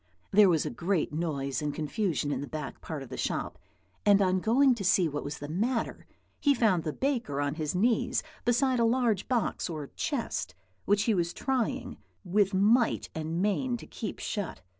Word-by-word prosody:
There 205 -1 +7
was 160 -4 +2
a - - -2
great 180 -8 -1
noise 140 -5 -2
and 150 -1 -2
confusion 155 - -1
in 135 -2 -2
the 145 - -5
back 150 -1 -6
part 155 -4 -5
of 130 - -12
the - - -6
shop; - - -2 0.4
and 200 -1 +6
on 185 -1 +2
going 255 +7 +4
to 225 -4 -5
see 180 -1 +4
what 145 -1 -4
was 145 +1 -5
the 145 - -7
matter, 225 - -2 0.3
he 285 -2 +3
found 210 -9 +2
the 155 - -2
baker 240 - -1
on 145 0 0
his 155 +1 -3
knees 240 +5 +2 0.2
beside 250 +1 +2
a - - +4
large 230 -4 +2
box 240 -6 0
or 155 -4 -6
chest, - - -2 0.3
which 205 0 +3
he 225 - +2
was 170 -3 0
trying 260 -3 -2 0.3
with 195 +1 +2
might 215 +5 +3
and 160 +3 -2
main 240 +5 0
to - - -11
keep 220 - -6
shut. 205 -4 -4
195 Hz, 190 wpm, -29 LUFS, 155-235 Hz, 0.4 s, There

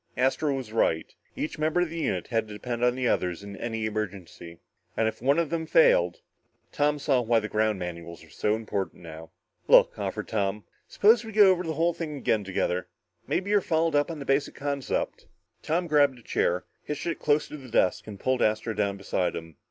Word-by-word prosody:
Astro 135 +3 +1
was 125 -5 -6
right. 80 -8 +1 0.2
Each 155 - -4
member 155 +3 +1
of 175 -3 -1
the 165 - -4
unit 155 - -1
had 115 -3 0
to 105 - -9
depend 120 +2 -4
on 125 0 +3
the 130 -1 0
other 90 - +1
in 100 +3 -8
any 115 0 -3
emergency. 95 -5 -5 0.4
And 110 - +2
if 110 - -4
one 140 +4 +3
of 170 -3 0
them 165 -1 -2
failed...? - - +4 0.5
Tom 150 -1 +1
saw 140 -3 +1
why 115 -1 +3
the 110 - -4
ground 110 -1 +1
manuals 85 -2 -7
were 80 - -18
so 105 +6 0
important 100 -5 -4
now. 80 0 -10 0.4
"Look," - - +6
offered - - -3
Tom. 105 -1 -1 0.2
"Suppose 225 +4 +4
we 225 - -8
go 205 -2 +7
over 180 -1 +1
the 160 -3 -3
whole 170 +3 +2
thing 155 -3 -5
again 110 -5 0
together. 90 -1 -1 0.4
Maybe 195 +2 -1
you're 205 -1 +4
fouled 160 -2 +1
up 145 +2 +2
on 165 - -5
the 140 - -7
basic 135 +1 0
concept." 140 -2 -3 0.3
Tom 170 +3 0
grabbed 145 -4 +3
a 120 - -17
chair, 90 -3 0 0.2
hitched 150 0 -5
it 170 - -2
close 150 0 +2
to 150 - -7
the 130 -3 -12
desk 95 -4 +1
and 100 -2 -8
pulled 130 +3 0
Astro 110 +1 +1
down 100 -2 -1
beside 95 -2 -1
him. 80 -1 -8
125 Hz, 210 wpm, -27 LUFS, 100-155 Hz, 0.5 s, go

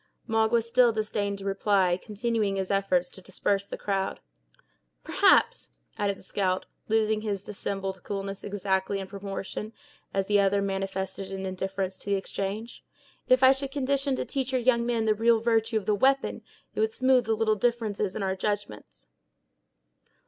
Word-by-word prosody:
Magua 225 0 +2
still 240 +1 +4
disdained 210 -2 -2
to 195 - -9
reply, 195 -2 +2
continuing 210 +1 -1
his 190 0 -2
efforts 195 -3 +2
to 190 - -12
disperse 195 +2 -1
the - - -6
crowd. 195 -1 -2 0.8
"Perhaps," - - +3 0.2
added 200 -1 -1
the - - -15
scout, 185 -1 -1 0.2
losing 220 -1 +2
his 200 -3 -3
dissembled 195 -2 -4
coolness 195 0 -5
exactly 195 -1 -1
in 195 - -4
proportion 195 +2 -6 0.4
as 195 0 0
the 205 +1 +3
other 200 0 +3
manifested 195 0 -3
an 190 0 -4
indifference 190 0 -3
to - - -14
the 200 - +3
exchange, 200 +3 -4 0.4
"if 255 +1 +4
I 260 - +9
should 270 0 -1
condition 275 0 0
to - - -3
teach 270 -1 -2
your 260 - +2
young 235 -1 +3
men 230 -2 +1
the 215 - +4
real 225 +1 +3
virtue 225 0 +1
of 210 - -3
the 210 - +2
we'pon, 270 +6 +2 0.3
it - - -5
would 220 0 +2
smoothe 255 -1 +3
the 220 0 +1
little 220 0 +2
differences 215 -3 -1
in 210 - -2
our 190 0 0
judgments." 195 - -4
205 Hz, 165 wpm, -27 LUFS, 195-225 Hz, 0.8 s, I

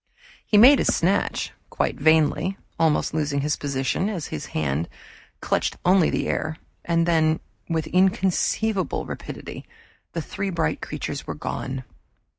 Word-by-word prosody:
He 210 - +2
made 260 +6 +8
his - - +2
snatch, 190 +4 0 0.2
quite - - -1
vainly, 160 +5 +3 0.2
almost 160 -3 +2
losing 145 -2 0
his 150 +1 0
position 140 +7 -1
as 175 -9 -3
his 75 - -5
hand 75 +1 -1 0.5
clutched - - 0
only 180 -2 +3
air; 155 0 -2 0.3
and 170 -1 +2
then, 160 -2 +3 0.3
with 160 -2 0
inconceivable 190 +2 +1
rapidity, - - -7 0.5
the 165 - -2
three 200 +4 -3
bright 170 - -1
creatures - - -5
were - - -4
gone. 130 0 -4
165 Hz, 130 wpm, -24 LUFS, 145-190 Hz, 0.5 s, made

